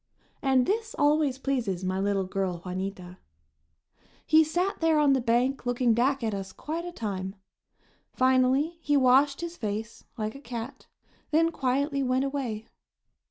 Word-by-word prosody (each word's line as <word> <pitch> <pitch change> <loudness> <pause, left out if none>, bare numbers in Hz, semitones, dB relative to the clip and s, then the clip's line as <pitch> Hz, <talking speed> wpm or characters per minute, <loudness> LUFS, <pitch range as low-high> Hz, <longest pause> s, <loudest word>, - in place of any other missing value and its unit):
And 265 -3 +3
this 445 - -1
always 290 -3 +2
pleases 240 -10 -2
my 185 +1 -1
little 200 0 +1
girl, 185 -2 -3
Juanita. 185 0 -5 1.1
He 315 +1 +6
sat 350 +5 -1
there 325 -1 +3
on 290 -2 +4
the 265 - +2
bank 245 +3 +1
looking 245 -1 +2
back 260 +3 +1
at 220 -2 -1
us 195 -1 -5
quite 330 +3 -5
a 350 - -5
time. 195 - -4 0.8
Finally 260 +5 +2
he 290 -2 +2
washed 275 +3 +4
his 340 0 -5
face, 220 +1 -4
like 215 -1 -3
a 275 - -11
cat, 240 +1 -7 0.4
then 330 +2 +3
quietly 275 0 0
went 260 0 +1
away. 255 -6 -3
255 Hz, 150 wpm, -27 LUFS, 215-290 Hz, 1.1 s, He